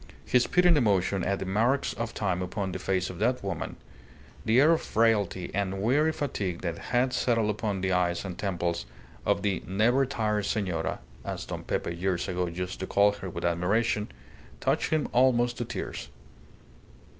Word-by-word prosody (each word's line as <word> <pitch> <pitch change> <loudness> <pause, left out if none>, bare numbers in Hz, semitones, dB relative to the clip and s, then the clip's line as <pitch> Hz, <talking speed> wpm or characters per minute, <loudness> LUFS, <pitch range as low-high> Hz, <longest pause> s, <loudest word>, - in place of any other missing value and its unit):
His 125 -1 +3
pitying 180 -2 +5
emotion 100 -6 +2
at 100 +2 0
the - - -4
marks 115 +9 +1
of 115 0 -4
time 95 -3 0
upon 95 +1 -3
the 95 - -4
face 95 0 0
of 90 - -10
that 125 +2 +1
woman, 95 -5 -4 0.7
the 115 +3 +4
air 150 +4 +6
of 165 - +3
frailty 105 -5 +1
and 95 -1 -1
weary 145 +10 +3
fatigue 100 - -3
that 85 -2 -3
had 125 +5 +1
settled 115 -3 +2
upon 105 -2 -2
the 95 0 0
eyes 90 0 +1
and 90 -2 -5
temples 85 -8 -2 0.4
of 100 - +2
the 100 -4 0
"Never 120 +8 +3
tired 105 -5 0
Senora" 90 -6 -1 0.2
(as - - -4
Don - - -5
Pepe 85 - -2
years 90 0 -1
ago 90 -1 -1
used 90 +2 -5
to 95 - -4
call 100 0 +4
her 100 -2 -7
with - - -5
admiration), 105 +5 +1 0.5
touched - - +1
him 155 -2 +1
almost 120 -1 +3
to 120 - -1
tears. 115 - -5
100 Hz, 175 wpm, -28 LUFS, 90-120 Hz, 0.7 s, air